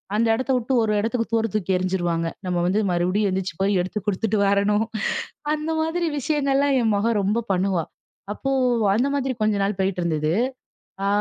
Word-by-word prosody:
அந்த 230 +1 +2
இடத்தை 260 +2 -1
விட்டு 250 +2 -1
ஒரு 215 -1 +1
இடத்துக்கு 230 +2 -1
தூர 225 0 +2
தூக்கி 195 -3 -1
எறிஞ்சிருவாங்க. 175 -3 -1 0.2
நம்ம 180 -1 -1
வந்து 195 +4 +2
மறுபடியும் 185 +4 +1
எந்திச்சு 185 -2 -2
போய் 195 0 +2
எடுத்து 185 +4 -3
குடுத்துட்டு 210 +2 0
வரணும். 205 +2 +2 0.7
அந்த 310 +1 -2
மாதிரி 335 +2 -1
விஷயங்கள்லாம் 280 -1 +1
என் 220 -2 +2
மக 225 +3 +1
ரொம்ப 210 +4 +1
பண்ணுவா. 185 -2 +1 0.5
அப்போ 270 +5 -3 0.4
அந்த 250 +5 +2
மாதிரி 265 -2 -1
கொஞ்ச 215 -1 +2
நாள் 200 -1 -1
போயிட்டு 190 -2 0
இருந்தது. 155 -2 0 0.7
ஆ - - +1
210 Hz, 165 wpm, -23 LUFS, 185-245 Hz, 0.7 s, அந்த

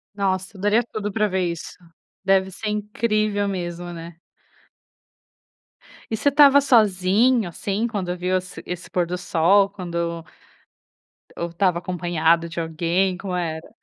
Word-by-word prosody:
Nossa, 190 0 -2
eu - - -10
daria 210 +4 +3
tudo 210 -1 -3
para 215 +1 +1
ver 185 -2 0
isso. 170 - -8 0.5
Deve 190 0 +2
ser 210 +3 -5
incrível 210 -1 0
mesmo, 175 -2 -4
né? 170 0 -10 1.9
E 220 - 0
você 285 - +3
estava 285 0 +7
sozinho 215 -2 +3
assim 200 +6 -2
quando 185 -5 -3
viu 185 +1 0
esse 185 0 -8
esse 175 -1 -6
pôr 180 -1 0
do 180 +1 -4
sol, 180 +3 +3
quando 170 -4 -4 1.1
ou 170 0 -3
estava 175 0 +1
acompanhado 170 -2 +1
de 170 - -5
alguém, 170 +3 0
como 185 -1 -4
era?. 160 -2 -4
185 Hz, 140 wpm, -22 LUFS, 170-205 Hz, 1.9 s, estava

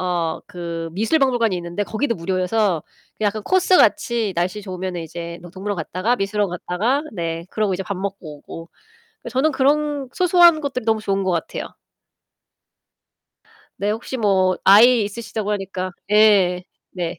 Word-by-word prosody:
어 175 -3 -1
그 170 -3 -5
미술 225 - +1
박물관이 240 -6 +2
있는데 175 +3 -3
거기도 230 +3 -2
무료여서 185 0 0 0.4
그 215 - -2
약간 210 +1 0
코스같이 305 - +3
날씨 185 +4 -2
좋으면은 185 -2 -5
이제 170 +1 -7
뭐 175 - -11
동물원 200 +1 -4
갔다가 185 +9 -1
미술원 205 -1 -1
갔다가 205 - -1
네 165 -2 -4
그러고 215 -3 0
이제 190 - -4
밥 200 -2 -4
먹고 190 -6 -6
오고. 165 +3 -10 0.6
저는 265 +6 +1
그런 285 0 +1
소소한 345 -3 +5
것들이 265 -4 -3
너무 220 -1 +2
좋은 195 -2 0
것 190 - 0
같아요. 170 - -4 2.1
네. 205 +1 +1
혹시 230 +4 -5
뭐 190 -5 +2
아이 225 +3 +7
있으시다고 210 0 -4
하니까 190 -2 -4 0.2
예. 200 -4 +4 0.3
네. 175 -2 -4
200 Hz, 320 characters per minute, -21 LUFS, 180-230 Hz, 2.1 s, 아이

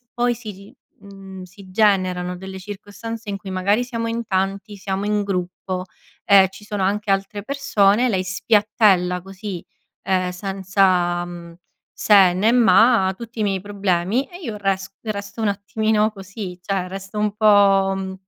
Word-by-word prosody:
poi 240 0 +1
si, 210 -4 -11 0.3
mhmm 195 -2 -11
si 190 +1 -15
generano 185 -3 +1
delle 190 +1 -8
circostanze 210 +3 -8
in 200 - -4
cui 195 - -9
magari 200 +5 +1
siamo 230 -2 -4
in 230 0 -3
tanti, 195 +1 -2
siamo 195 +1 -3
in 210 0 +1
gruppo, 185 -1 -3 0.4
ehm, 195 -2 +6
ci 195 +2 -14
sono 205 -2 -3
anche 205 +2 -1
altre 195 +1 -1
persone, 240 -3 +2
lei 185 -2 0
spiattella 195 -2 +2
così, 195 -1 -7 0.4
ehm, 185 -1 0
senza, 185 -2 +1
mhmm, 170 -1 -10 0.4
se 195 -4 +5
né 215 +5 +2
ma, 225 -3 +5
tutti 230 -1 -8
i - - +2
miei 195 -2 0
problemi 200 +4 -1
e 355 +1 -11
io 225 -10 -5
res 195 -1 -1
resto 205 0 -5
un 215 - +1
attimino 210 +2 0
così: 195 -2 -8
cioè 190 -1 -2
resto 195 +2 -7
un 210 -1 0
po', 200 -2 +4
mhmm, 190 0 -5
195 Hz, 155 wpm, -21 LUFS, 190-210 Hz, 0.4 s, ehm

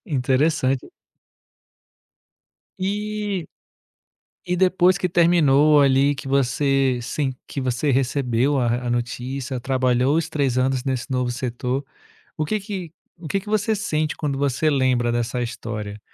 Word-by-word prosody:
Interessante. 135 - +1 1.9
E 205 -1 -2 1.0
e 180 0 0
depois 185 0 +3
que 180 - 0
terminou 155 -4 +4
ali, 140 +1 +4
que 135 0 -8
você 135 -1 +2
sim, 130 +2 -2
que 140 - -5
você 130 +3 0
recebeu 135 0 +1
a 120 0 0
a - - -1
notícia, 125 +2 -3
trabalhou 130 +2 +1
os 165 -1 0
3 140 -5 0
anos 130 0 0
nesse 130 0 -3
novo 125 -1 0
setor, 125 +2 -3 0.5
o 155 - 0
que 215 +6 -1
que 190 -5 -6 0.3
o 165 - -8
que 195 - 0
que 210 - -11
você 215 +1 +1
sente 155 -7 -1
quando 140 -3 -2
você 140 +2 +1
lembra 130 -4 +2
dessa 120 +1 -1
história? 105 -3 -5
135 Hz, 135 wpm, -22 LUFS, 125-160 Hz, 1.9 s, terminou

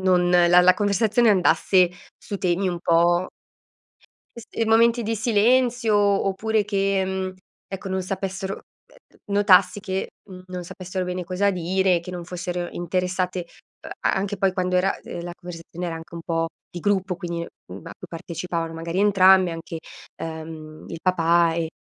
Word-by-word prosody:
non 180 -1 +3
la 175 0 +6
la 180 0 +6
conversazione 215 +3 +2
andasse 185 -1 +3 0.3
su 200 - -6
temi 185 +1 0
un 175 -1 -3
po' 175 +2 +3 1.1
s 235 - -8
e 225 - -1
momenti 230 +2 +4
di 225 +1 -1
silenzio, 235 +1 +2
oppure 205 +2 +1
che, 195 -1 0
mhmm, 190 0 -3 0.3
ecco 195 0 -6
non 190 0 -1
sapessero 190 +1 -4
ehm, - - -13 0.6
ehm, 205 - -5
notassi 200 -1 +5
che, 190 -1 -3 0.2
mhmm, 185 -1 -10
non 180 -1 -6
sapessero 185 +1 -5
bene 180 0 -3
cosa 185 +3 0
dire, 185 0 +1
che 170 +2 -9
non 175 -1 -6
fossero 180 0 -4
interessate 180 +1 -2 0.6
a - - +2
anche 200 +1 -2
poi 195 0 +2
quando 185 -1 -1
era 185 +2 +2
uhm, - - -11
de - - -5
la 175 - -5
conversazione 175 0 -8
era 165 - -4
anche 165 +1 -11
un 170 - -6
po' 165 -1 -1 0.2
di 175 - -7
gruppo, 195 -1 0
quindi 170 -1 -4
a 95 - -11
cui - - -10
partecipavano 170 0 -4
magari 165 +2 -3
entrambe 190 -3 +5
anche, 165 0 -7 0.4
ehm, 160 -1 -8
il 165 - -7
papà 170 -2 +3
e 165 -1 -2
185 Hz, 165 wpm, -23 LUFS, 175-195 Hz, 1.1 s, la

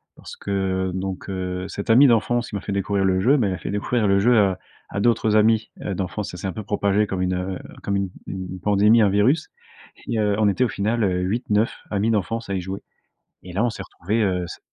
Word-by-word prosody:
parce - - -11
que, 95 -2 -1
donc, 95 +1 -4
heu, 90 -1 -3
cet 100 - -6
ami 130 +5 +7
d'enfance, 120 0 +2
qui 105 - -6
m'a 100 - -3
fait 100 - -5
découvrir 100 0 0
le 95 -1 +2
jeu, 130 +9 +4
bah, 120 -7 +2
il 95 - -1
a - - -3
fait - - -5
découvrir 105 +2 0
le 100 0 +4
jeu 120 +3 +4
à 95 -3 +2 0.3
à 100 - -2
d'autres 110 -1 +2
amis, 110 +1 +3
heu, 100 - -2
d'enfance. 95 +2 -4
Ça 90 - -8
s'est 95 - -4
un 95 - -3
peu 110 - -6
propagé 100 +1 +1
comme 95 -1 -3
une, 90 0 0
heu, 90 +1 -3 0.2
comme 100 0 0
une 100 -1 -1 0.2
une 95 -1 -6
pandémie, 105 +3 +4
un 105 - +4
virus, 120 +11 +2 0.6
et, 115 - -1
heu, 105 -1 +1
on 110 - +4
était 100 +5 +2
au 125 - +1
final, 110 +4 -1
heu, 90 -2 +1
8-9 110 +2 0 0.2
amis 105 +2 +1
d'enfance 115 +1 -2
à - - -1
y 90 - -1
jouer. 95 +2 -5 0.6
Et 90 - -10
là, 100 +5 +1
on 120 - +2
s'est 110 - -7
retrouvés, 105 +7 -2
heu, 90 -4 0
se - - -9
100 Hz, 245 wpm, -23 LUFS, 95-110 Hz, 0.6 s, ami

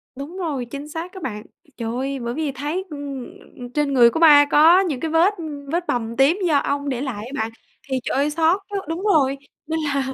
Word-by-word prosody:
Đúng 290 +7 -8
rồi, 295 -9 -3
chính 280 +4 -8
xác 330 +3 -6
đó 380 - -8
bạn. 210 -4 -4 0.3
Trời 230 0 -3
ơi! 270 +1 -3
Bởi 235 0 -4
vì 305 -1 -2
thấy, 295 +8 -4
ừm, 280 -4 -6 0.5
trên 295 -2 0
người 240 -2 +7
của 320 - -3
ba 295 -3 +8
có 325 +5 +7
những 320 -10 -1
cái 320 -1 -3
vết 345 +6 +4 0.4
vết 345 +1 -1
bầm 230 -1 -2
tím 280 +8 +4
do 295 -3 +3
ong 285 0 -1
để 255 -1 -2
lại 230 -6 -4
á 255 - -9
bạn, 225 - -5 0.4
thì 260 -1 0
trời - - -2
ơi, 285 +2 +2
xót 330 +5 +2
quá! 400 -1 -2
Đúng 330 +4 -4
rồi, 280 -9 +3 0.3
nên 320 0 -1
là 280 -3 -1
285 Hz, 225 wpm, -22 LUFS, 265-325 Hz, 0.5 s, ba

